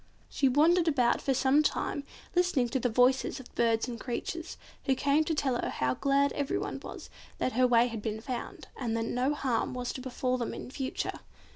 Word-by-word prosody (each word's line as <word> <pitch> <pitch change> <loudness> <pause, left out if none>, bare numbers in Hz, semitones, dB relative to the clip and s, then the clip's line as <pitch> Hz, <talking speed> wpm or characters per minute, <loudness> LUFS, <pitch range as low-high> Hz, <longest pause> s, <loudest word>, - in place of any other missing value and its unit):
She 270 - +2
wandered 330 +6 +4
about 255 -6 +3
for 270 - +1
some 270 +4 +4
time 285 -1 -1 0.3
listening 350 -9 +2
to 265 - 0
the 245 - +1
voices 250 +3 +3
of 260 - -13
birds 230 0 +2
and 235 -2 -5
creatures, 325 +8 -4 0.3
who 265 - +3
came 280 +4 +2
to 320 - 0
tell 265 -4 0
her - - -2
how 130 0 0
glad 280 - +2
everyone 285 -1 -2
was - - -9 0.3
that 255 - 0
her 255 +2 +3
way 240 -1 +5
had 230 -3 -4
been 220 0 -3
found, 265 - -6
and 230 -3 -2
that 225 - -1
no 255 +5 0
harm 255 -3 -1
was 250 -1 -3
to 260 - -6
befall 255 0 -1
them 235 - -3
in - - -8
future. 265 -1 -3
255 Hz, 205 wpm, -30 LUFS, 240-280 Hz, 0.3 s, way